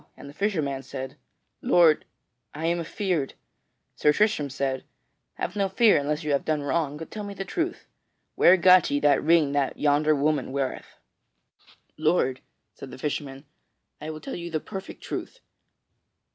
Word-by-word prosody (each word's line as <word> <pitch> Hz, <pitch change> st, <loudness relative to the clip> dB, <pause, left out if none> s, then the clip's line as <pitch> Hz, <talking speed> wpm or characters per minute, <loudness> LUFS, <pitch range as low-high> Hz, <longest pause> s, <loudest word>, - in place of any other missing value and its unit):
And -, -, -11 dB
the 140 Hz, -, -11 dB
fisher 200 Hz, -2 st, 0 dB
man 135 Hz, -1 st, -3 dB
said, 130 Hz, -1 st, -7 dB, 0.5 s
"Lord, 165 Hz, -3 st, +4 dB, 0.5 s
I 160 Hz, +2 st, -4 dB
am 170 Hz, +1 st, +1 dB
afeard!" 170 Hz, -4 st, -2 dB, 0.6 s
Sir 150 Hz, -, +4 dB
Tristram 205 Hz, -5 st, +1 dB
said: 135 Hz, 0 st, -2 dB, 0.5 s
"Have -, -, -4 dB
no 200 Hz, -1 st, 0 dB
fear, 215 Hz, +2 st, +5 dB
unless 150 Hz, +3 st, -2 dB
you 150 Hz, -, -1 dB
have 140 Hz, -, +1 dB
done 155 Hz, -2 st, -1 dB
wrong, 145 Hz, +1 st, -1 dB
but 160 Hz, -, -9 dB
tell 215 Hz, -, -6 dB
me 200 Hz, -1 st, -7 dB
the 195 Hz, -, -5 dB
truth. 340 Hz, -, -3 dB, 0.5 s
Where 180 Hz, +2 st, +6 dB
got 185 Hz, -1 st, +6 dB
ye 145 Hz, -, +1 dB
that 145 Hz, -2 st, +4 dB
ring 160 Hz, -3 st, +3 dB
that 140 Hz, -1 st, 0 dB
yonder 150 Hz, +1 st, +3 dB
woman 145 Hz, -1 st, 0 dB
weareth?" 135 Hz, -1 st, -4 dB, 1.0 s
"Lord," 155 Hz, -5 st, +1 dB, 0.3 s
said 135 Hz, -, -10 dB
the -, -, -10 dB
fisherman, 140 Hz, 0 st, -4 dB, 0.6 s
"I 155 Hz, -, -5 dB
will 155 Hz, -1 st, -7 dB
tell 270 Hz, -, -6 dB
you 170 Hz, 0 st, -6 dB
the 160 Hz, -2 st, -1 dB
perfect 190 Hz, +3 st, -9 dB
truth. -, -, -6 dB
155 Hz, 165 wpm, -26 LUFS, 140-180 Hz, 1.0 s, Where